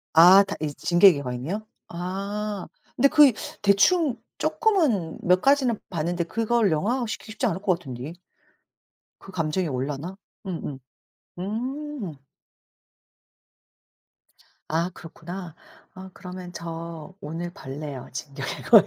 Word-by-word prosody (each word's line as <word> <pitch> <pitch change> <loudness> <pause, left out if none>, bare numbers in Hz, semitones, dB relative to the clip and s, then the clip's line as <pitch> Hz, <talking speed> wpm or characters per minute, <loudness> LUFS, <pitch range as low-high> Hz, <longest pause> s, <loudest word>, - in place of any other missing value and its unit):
아 180 +5 +9
다 200 - -3
이 150 -1 -1
진격의 175 -4 +5
거인이요? 130 - -3 0.2
아 195 +3 -4 0.3
근데 280 +3 +6
그 300 0 +8
이 255 - +2 0.3
대충 240 - +4 0.2
쪼끔은 300 - +1
몇 180 +1 +4
가지는 270 -5 +3
봤는데 170 +1 -1
그걸 225 0 +2
영화화시키기 220 +6 -1
쉽지 220 - -2
않을 185 +3 -2
것 185 -4 +2
같은데. 135 0 -7 1.1
그 195 - -12
감정이 165 0 0
올라나? 140 +6 -3 0.3
음음. 160 -7 -4 0.6
음. 245 - -4 2.5
아 165 +3 0
그렇구나. 170 +1 -8 0.4
아 190 0 -10
그러면 180 -1 -8
저 165 0 -7
오늘 170 +2 -4
볼래요 135 -2 -7
진격의 140 +1 -5
거인. - - +8
180 Hz, 230 characters per minute, -25 LUFS, 160-215 Hz, 2.5 s, 아